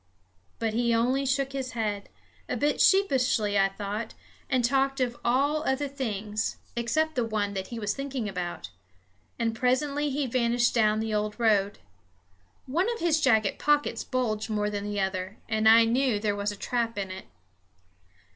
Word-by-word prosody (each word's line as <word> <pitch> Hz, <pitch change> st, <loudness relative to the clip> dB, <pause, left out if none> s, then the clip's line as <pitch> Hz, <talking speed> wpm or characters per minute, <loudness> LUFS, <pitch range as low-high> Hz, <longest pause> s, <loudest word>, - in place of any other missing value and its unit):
But 225 Hz, -1 st, -1 dB
he 235 Hz, 0 st, +2 dB
only 255 Hz, +4 st, +1 dB
shook 270 Hz, +1 st, 0 dB
his 265 Hz, -2 st, -4 dB
head 210 Hz, -3 st, -3 dB, 0.4 s
a -, -, -1 dB
bit 290 Hz, 0 st, +1 dB
sheepishly, 255 Hz, -, +3 dB
I 195 Hz, -1 st, +4 dB
thought 205 Hz, +3 st, -5 dB, 0.3 s
and 255 Hz, -3 st, +2 dB
talked 270 Hz, +2 st, +1 dB
of 245 Hz, -2 st, 0 dB
all 280 Hz, +5 st, +2 dB, 0.2 s
things 220 Hz, -7 st, -3 dB, 0.2 s
except 310 Hz, +7 st, 0 dB
the 250 Hz, -4 st, 0 dB
one 210 Hz, -3 st, -1 dB
that 190 Hz, -1 st, -4 dB
he 235 Hz, -, -7 dB
was 210 Hz, -2 st, -1 dB
thinking 275 Hz, -5 st, -4 dB
about; 175 Hz, -, -5 dB, 0.7 s
and 230 Hz, -1 st, 0 dB
presently 280 Hz, +5 st, 0 dB
he 280 Hz, +1 st, -1 dB
vanished 240 Hz, 0 st, +1 dB
down 215 Hz, -2 st, +2 dB
the 220 Hz, -1 st, -2 dB
old 210 Hz, +1 st, -2 dB
road. 205 Hz, -3 st, +2 dB, 0.9 s
One 350 Hz, -, 0 dB
of 465 Hz, -, -4 dB
his 325 Hz, -2 st, +2 dB
jacket 220 Hz, -7 st, +2 dB
pockets 295 Hz, 0 st, +1 dB
bulged 225 Hz, -4 st, -2 dB
more 210 Hz, -1 st, -1 dB
than 205 Hz, 0 st, -3 dB
the 205 Hz, 0 st, -3 dB
other, 190 Hz, +1 st, -2 dB
and 220 Hz, 0 st, +3 dB
I 225 Hz, +1 st, +7 dB
knew 245 Hz, 0 st, +2 dB
there 205 Hz, -1 st, 0 dB
was 205 Hz, +1 st, -1 dB
a -, -, -7 dB
trap 230 Hz, 0 st, -2 dB
in 195 Hz, -2 st, -3 dB
it. 190 Hz, 0 st, -8 dB
230 Hz, 165 wpm, -27 LUFS, 210-265 Hz, 0.9 s, I